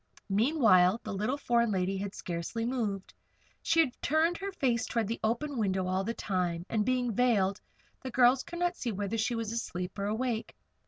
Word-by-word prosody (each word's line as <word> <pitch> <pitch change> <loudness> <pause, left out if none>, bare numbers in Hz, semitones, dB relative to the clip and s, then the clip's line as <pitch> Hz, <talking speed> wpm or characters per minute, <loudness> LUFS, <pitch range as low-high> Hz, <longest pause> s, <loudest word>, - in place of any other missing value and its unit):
Meanwhile 210 - +4
the 215 - -5
little 215 +8 -1
foreign 235 -4 +2
lady 190 -1 0
had 195 0 -4
scarcely 175 +7 -4
moved. 220 -6 -2 0.5
She 330 - +2
had 260 -6 -2
turned 315 +3 +2
her 395 0 -4
face 250 -11 0
toward 230 -3 -1
the 230 - -3
open 240 +5 -1
window 190 -3 0
all 185 +1 0
the 230 +4 -3
time, 180 -3 -2
and 220 -2 +1
being 250 0 0
veiled, 205 -5 +2 0.4
the 260 - -5
girls 250 +1 +4
could 345 - -8
not 350 +1 0
see 240 - -3
whether 205 +2 -2
she 235 +2 0
was 225 -2 -3
asleep, 180 -5 -4
or 200 - -1
awake. 225 +2 -2
225 Hz, 190 wpm, -30 LUFS, 195-250 Hz, 0.5 s, Meanwhile